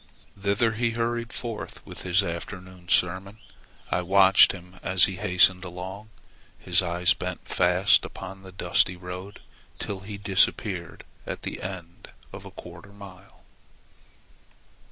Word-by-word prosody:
Thither 100 +3 +1
he 115 +2 0
hurried 120 0 -1
forth 115 -3 -6
with - - -9
his 90 +2 +2
afternoon 90 0 -7
sermon. 95 +4 +1 0.5
I - - +1
watched 95 +1 +6
him 90 -1 -12
as 95 -1 +4
he 95 -2 +3
hastened 90 -1 +4
along, 95 +4 -8 0.5
his 90 +1 +2
eyes 90 0 +2
bent 90 0 -6
fast 90 +2 +4
upon 95 0 -8
the 95 -1 -12
dusty 90 0 +1
road 90 +2 -8 0.4
till 100 -2 -5
he 100 +1 -8
disappeared 95 -2 0 0.2
at - - -5
the - - -5
end 90 -2 -8 0.2
of - - -9
a - - -8
quarter 85 +2 -12
of 100 - -18
a - - -18
mile. 95 -1 -14
95 Hz, 140 wpm, -26 LUFS, 90-100 Hz, 0.5 s, watched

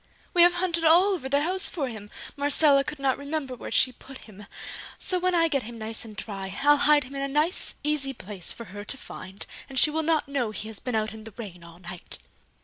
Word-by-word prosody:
"We 350 - +5
have 350 +1 +7
hunted 345 -2 0
all 350 +5 +6
over 265 -8 -4
the 280 +1 +3
house 370 +3 +3
for 295 -6 -2
him! 215 -4 -8 0.3
Marcella 285 0 +4
could 300 - -5
not 275 -1 0
remember 285 -2 -3
where 250 - -7
she 255 - +3
put 265 +2 -12
him; 210 -1 -13 0.5
so 365 -1 0
when 365 0 +1
I 330 -1 +4
get 280 -4 0
him 235 +1 -8
nice 220 0 -1
and 220 -2 -10
dry, 195 -2 -6
I'll 290 +1 +7
hide 295 0 +5
him 260 +2 -10
in 275 - -3
a 275 - 0
nice 300 +6 +2
easy 295 -2 0
place 200 -7 -3
for 235 - -6
her 205 0 -6
to 270 - -2
find, 190 -5 -7 0.2
and 270 - -6
she 300 - +6
will 320 +1 0
not 315 -2 +1
know 275 -5 -1
he 215 +1 -3
has 220 - -7
been 250 -2 -3
out 220 0 0
in 220 0 -10
the 225 - -10
rain 190 -7 -8
all 170 0 -12
night!" 175 0 -7
270 Hz, 240 wpm, -26 LUFS, 215-305 Hz, 0.5 s, have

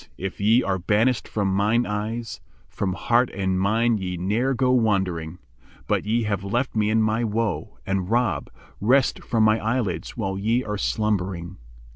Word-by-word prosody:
if 95 0 -5
ye 110 +5 +4
are 95 -1 -1
banisht 110 +6 +1
from 105 -2 -1
mine 110 +5 +2
eyes, 110 +1 -4
* 65 - -33
From 95 -2 0
heart 120 +5 +2
and 95 -1 0
mind 110 +3 +2
ye 90 -1 -4
ne'er 110 +9 0
go 125 +1 +2
wandering: 95 -9 0 0.5
But - - 0
ye 115 +2 +1
have 100 -3 -2
left 120 +7 -1
me 105 -1 +2
in 110 0 +3
my 110 +2 +1
woe, 105 -7 -2
and 95 -1 -1
rob 115 - 0 0.2
* - - -28
Rest 130 +6 +2
from 115 -2 +1
my 110 +1 +4
eyelids 110 -8 -2
while 95 -4 -2
ye 115 +5 +1
are 105 -2 -4
slumbering." 95 -5 -1
105 Hz, 175 wpm, -24 LUFS, 95-115 Hz, 0.5 s, ye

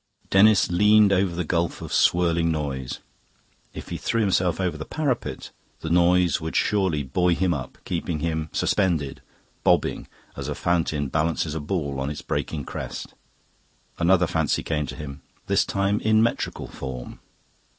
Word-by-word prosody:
Denis 100 0 +5
leaned 105 +2 +5
over 95 -2 +1
the 90 - -1
gulf 85 +1 -1
of - - -7
swirling 85 -1 +3
noise. 70 -5 -3 0.7
If - - -9
he - - -3
threw 115 - -1
himself 95 -4 +1
over 90 -4 0
the 75 - -5
parapet, 140 - -3 0.3
the 80 - -4
noise 90 0 +3
would 80 0 -5
surely 95 -8 +1
buoy 90 +6 +1
him 90 -1 +1
up, 65 -5 -6
keep 85 - -3
him 80 -1 -2
suspended, 85 -9 0 0.4
bobbing, - - +2 0.3
as - - -5
a - - -3
fountain 80 -5 0
balances 80 +1 0
a 80 - -3
ball 75 -3 -2
on 65 +1 -2
its 75 - -6
breaking 75 -4 -3
crest. - - -6 0.9
Another 90 +1 +4
fancy 80 -2 0
came 75 -2 -1
to - - -7
him, 70 -2 -8 0.2
this - - +3
time 100 +1 0
in 110 0 +3
metrical 115 - -2
form. 65 -2 -7
85 Hz, 155 wpm, -24 LUFS, 75-95 Hz, 0.9 s, Denis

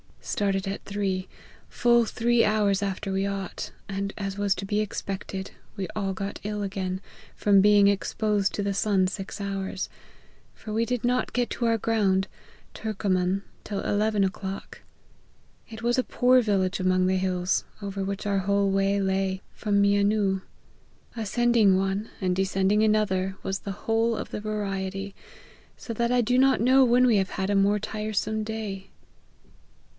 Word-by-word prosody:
Started 195 -1 -1
at 195 - -4
three, 195 -2 -2 0.4
full 235 -1 +3
three 235 +1 +2
hours 205 -2 +2
after 195 0 -3
we 195 +1 0
ought, 195 -2 -4 0.2
and, 195 +1 -3
as 195 -1 -4
was 200 -1 +1
to 195 - -5
be 205 +1 0
expected, 195 -2 -4 0.2
we 195 -3 -3
all 195 -2 -1
got 195 +1 -5
ill 210 0 -3
again, 190 -2 -3 0.3
from 200 -2 +4
being 205 0 +6
exposed 205 0 +1
to 205 - -2
the 200 0 0
sun 195 -1 +2
six 195 +1 -6
hours; 195 -1 -3 0.7
for 215 - -7
we 225 +2 +1
did 245 -2 -2
not 250 +1 0
get 245 -1 0
to 240 - -2
our 230 -1 +3
ground, 200 -4 +1 0.5
Turcoman, 195 -3 -1 0.2
till 200 -2 -4
eleven 210 0 +1
o'clock. 195 +1 -4 0.9
It 225 0 -9
was 240 +2 +2
a - - +2
poor 255 +1 +4
village 195 -4 0
among 185 0 +2
the 190 0 +2
hills, 185 0 0 0.2
over 195 -1 -4
which 195 +1 -4
our 200 -1 +1
whole 200 +1 +1
way 195 +1 +2
lay, 190 -1 0
from 205 -2 +1
Mianu. 200 -1 +2 0.7
Ascending 225 -2 +3
one, 195 +3 -1
and 185 -2 0
descending 195 +2 +2
another, 195 -3 +1
was 195 0 -2
the 200 0 -7
whole 225 +1 +2
of - - -5
the - - -4
variety, 195 -2 -3 0.6
so 230 - -6
that 235 +2 0
I 250 0 +4
do 245 +2 +1
not 265 -2 +4
know 260 +3 +6
when 250 +1 +4
we 235 -4 +4
have 195 0 0
had 190 0 -2
a - - +2
more 200 +1 +3
tiresome 215 +1 -2
day." 210 -3 -5
200 Hz, 160 wpm, -26 LUFS, 195-215 Hz, 0.9 s, being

